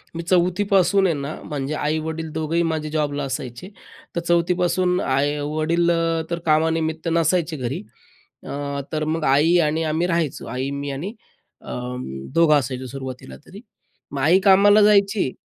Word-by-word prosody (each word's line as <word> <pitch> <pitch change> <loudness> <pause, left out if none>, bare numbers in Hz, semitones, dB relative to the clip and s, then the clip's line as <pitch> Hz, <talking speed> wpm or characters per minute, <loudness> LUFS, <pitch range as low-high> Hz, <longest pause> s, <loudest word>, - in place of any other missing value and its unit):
मी 170 - -4
4थी 180 +2 +2
पासून 195 +1 +4
आहे 165 - +1
ना, 140 +2 -4
म्हणजे 145 -1 -4
आई-वडील 160 +1 -2
दोघंही 160 +2 0
माझे 155 -1 -3
जॉबला 145 -2 -1
असायचे 130 +4 -5 0.5
तर - - +1
4थी 170 +1 +2
पासून 180 +1 +1
आई 140 +2 0
वडील 155 +4 0 0.4
तर 170 - -1
कामानिमित्त 160 +1 +1
नसायचे 165 -1 +1
घरी. 125 -1 -3 0.6
अ, - - -10 0.4
तर 155 -1 -1
मग 165 -1 -3
आई 165 +4 +4
आणि 160 +2 -1
आम्ही 170 +3 0
राहायचो. 165 -5 -1
आई 130 +3 -3
मी 145 - -4
आणि 170 +11 -5 0.5
अ, - - -12 0.6
दोघं 165 -2 +5
असायचो 130 0 -5
सुरुवातीला 130 - -8
तरी. - - -12 0.5
मग 140 - -4
आई 170 +7 +5
कामाला 200 +2 +6
जायची 200 -7 +3
160 Hz, 150 wpm, -22 LUFS, 145-175 Hz, 0.6 s, कामाला